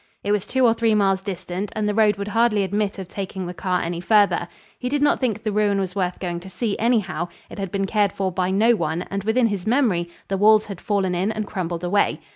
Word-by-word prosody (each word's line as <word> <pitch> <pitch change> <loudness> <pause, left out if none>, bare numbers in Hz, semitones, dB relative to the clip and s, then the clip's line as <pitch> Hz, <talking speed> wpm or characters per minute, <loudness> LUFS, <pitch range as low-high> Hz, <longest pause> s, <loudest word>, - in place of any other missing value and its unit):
It 205 - -1
was 205 -2 0
two 260 -1 +2
or 230 - +5
three 225 -1 +2
miles 195 -2 +2
distant 190 0 -5
and 215 -1 0
the 210 - 0
road 210 -1 +4
would 200 +1 -5
hardly 225 -1 +2
admit 205 +1 -1
of 190 -2 -6
taking 190 -1 -5
the 175 - -5
car 180 0 -1
any 170 0 -3
farther. 200 -2 +3 0.3
He 250 - -2
did 290 +1 0
not 290 - +3
think 225 -5 -1
the 215 - -1
ruin 205 -1 +2
was 185 -1 -3
worth 180 -2 -1
going 175 -2 -3
to 185 +2 -11
see, 215 +1 -2
anyhow; 210 -8 +1 0.2
it - - -8
had 195 -1 -3
been 195 0 0
cared 205 0 +1
for 190 -1 -2
by 180 0 -1
no 220 +5 +4
one 165 -2 -2
and 195 0 -2
within 225 +4 +2
his 205 -3 -2
memory 220 -9 +2 0.2
the 195 - -1
walls 215 +2 +5
had 200 -4 -8
fallen 195 -3 0
in 185 +4 0
and 215 -1 -3
crumbled 175 -4 -4
away. 200 +3 +1
200 Hz, 250 wpm, -22 LUFS, 185-215 Hz, 0.3 s, or